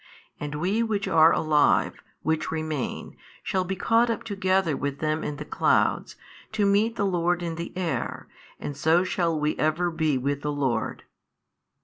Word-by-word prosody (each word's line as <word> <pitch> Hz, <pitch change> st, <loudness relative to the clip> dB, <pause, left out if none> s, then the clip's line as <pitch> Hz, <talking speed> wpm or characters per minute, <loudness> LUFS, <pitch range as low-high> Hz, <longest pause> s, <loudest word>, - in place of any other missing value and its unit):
And 150 Hz, 0 st, -5 dB
we 185 Hz, +9 st, 0 dB
which 215 Hz, -3 st, -1 dB
are 160 Hz, 0 st, +6 dB
alive, 150 Hz, -3 st, +2 dB, 0.2 s
which 160 Hz, 0 st, 0 dB
remain, 155 Hz, -3 st, -4 dB, 0.3 s
shall 190 Hz, -1 st, 0 dB
be 190 Hz, +1 st, -3 dB
caught 230 Hz, +5 st, +2 dB
up 230 Hz, -, -2 dB
together 190 Hz, -6 st, +1 dB
with 140 Hz, 0 st, -3 dB
them 155 Hz, +1 st, -1 dB
in 150 Hz, -, -3 dB
the 150 Hz, +1 st, -7 dB
clouds, -, -, +1 dB, 0.4 s
to 210 Hz, -2 st, +1 dB
meet 210 Hz, +3 st, +2 dB
the 200 Hz, -, 0 dB
Lord 175 Hz, -2 st, 0 dB
in 170 Hz, -1 st, -2 dB
the 170 Hz, +1 st, -6 dB
air, 180 Hz, -3 st, -3 dB, 0.3 s
and 145 Hz, -, -5 dB
so 160 Hz, +5 st, +3 dB
shall 175 Hz, -5 st, 0 dB
we 150 Hz, +1 st, 0 dB
ever 160 Hz, +3 st, +1 dB
be 160 Hz, -4 st, +1 dB
with 140 Hz, +2 st, -2 dB
the 150 Hz, -, -2 dB
Lord. 140 Hz, -4 st, -2 dB
165 Hz, 165 wpm, -26 LUFS, 150-190 Hz, 0.4 s, are